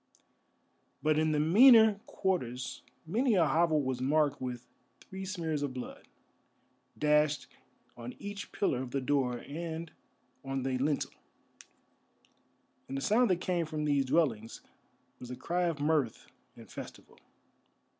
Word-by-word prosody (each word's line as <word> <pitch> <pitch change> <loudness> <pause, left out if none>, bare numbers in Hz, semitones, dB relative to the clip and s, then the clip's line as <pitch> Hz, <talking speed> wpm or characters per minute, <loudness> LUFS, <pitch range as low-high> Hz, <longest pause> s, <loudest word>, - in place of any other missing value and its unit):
But 155 0 +3
in 155 0 +2
the 150 - +1
meaner 220 - +7
quarters 130 - -2 0.2
many 225 - +1
a 175 -3 +4
hovel 155 0 +2
was 130 -1 -2
marked 145 +2 +1
with 125 -1 -5 0.3
three 190 0 -8
smears 165 -6 -3
of 140 -3 -3
blood, 125 - -8 0.9
dashed 150 0 +2 0.5
on 120 +1 -8
each 205 0 -7
pillar 135 -11 0
of 130 - -5
the 135 - -1
door 130 -2 0
and 165 +1 -5 0.5
on 135 -1 -3
the 130 -1 -1
lintel; 145 +2 0 1.8
and 135 - -4
the - - -3
sound 230 - +3
that 180 -1 +1
came 175 -3 -1
from 155 -1 -3
these 140 -2 +2
dwellings 130 -7 0 0.6
was 125 - -9
the 125 - -5
cry 175 +8 -1
of 165 -4 -2
mirth 145 -5 0 0.3
and - - -13
festival. - - -10
150 Hz, 135 wpm, -31 LUFS, 130-170 Hz, 1.8 s, meaner